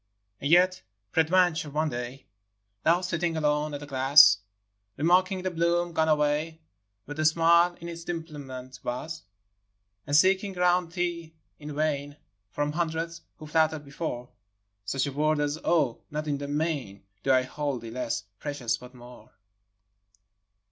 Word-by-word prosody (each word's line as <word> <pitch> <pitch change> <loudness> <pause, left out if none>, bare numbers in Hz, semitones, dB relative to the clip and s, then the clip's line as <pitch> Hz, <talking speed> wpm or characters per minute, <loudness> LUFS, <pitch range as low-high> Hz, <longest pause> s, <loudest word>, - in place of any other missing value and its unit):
IV. 100 0 -50
And 140 - -1
yet 180 +1 +5 0.3
peradventure 165 -1 +3
one 155 +2 0
day 125 +2 -6 0.6
Thou, 170 +2 +3
sitting 170 -2 -1
alone 150 -1 0
at 145 - -7
the - - -7
glass, 135 -5 +6 0.6
Remarking 185 +4 +2
the 185 - -1
bloom 170 0 +1
gone 160 -1 +2
away, 150 +1 +1 0.5
Where 145 - -6
the 155 +1 -2
smile 170 +2 +4
in 170 - -8
its 170 0 -7
dimplement 140 -7 -7
was, 155 +7 -4
v. - - -30 0.8
And 145 - +1
seeking 190 +3 +3
around 180 -1 +2
thee 170 -2 -3 0.2
in 150 -1 -7
vain, 145 -1 -1 0.3
From 145 +6 -2
hundreds 165 +1 -2 0.2
who 155 - -10
flattered 155 -1 +1
before, 140 -4 -5 0.6
Such 135 +7 0
a 140 - -3
word 155 +2 +1
as, 145 +1 -1
" - - -25
Oh, 150 -9 +1
not 150 +1 -4
in 145 -1 -1
the 140 - -5
main 145 - -2 0.2
Do 135 - +1
I 130 -1 +4
hold 135 -2 -4
thee 115 - -7
less 115 -3 -3 0.2
precious, 140 -6 -2
but 125 +1 -13
more 125 0 -14
155 Hz, 155 wpm, -27 LUFS, 140-170 Hz, 0.8 s, glass